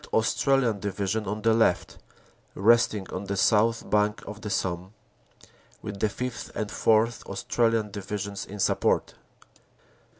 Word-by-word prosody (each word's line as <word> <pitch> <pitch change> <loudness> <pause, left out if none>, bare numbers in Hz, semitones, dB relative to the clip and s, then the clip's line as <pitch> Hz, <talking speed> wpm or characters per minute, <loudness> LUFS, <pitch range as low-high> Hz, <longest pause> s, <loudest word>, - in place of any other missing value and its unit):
Australian 120 0 +2
Division 100 +1 -2
on 105 +1 -3
the 115 0 +4
left, 110 -6 +1 0.6
resting 110 -1 +3
on 95 +2 -4
the 100 0 -3
south 115 +3 +3
bank 105 0 +1
of 105 +1 -8
the 105 - -5
Somme, 90 +1 -2 0.9
with 100 -2 -6
the 110 - +2
Sth. 125 +3 -5
and 105 -1 -3
4th. 115 +1 +2
Australian 115 -3 0
Divisions 100 0 -5
in 105 - -9
support. 100 - +1
105 Hz, 130 wpm, -26 LUFS, 100-115 Hz, 0.9 s, the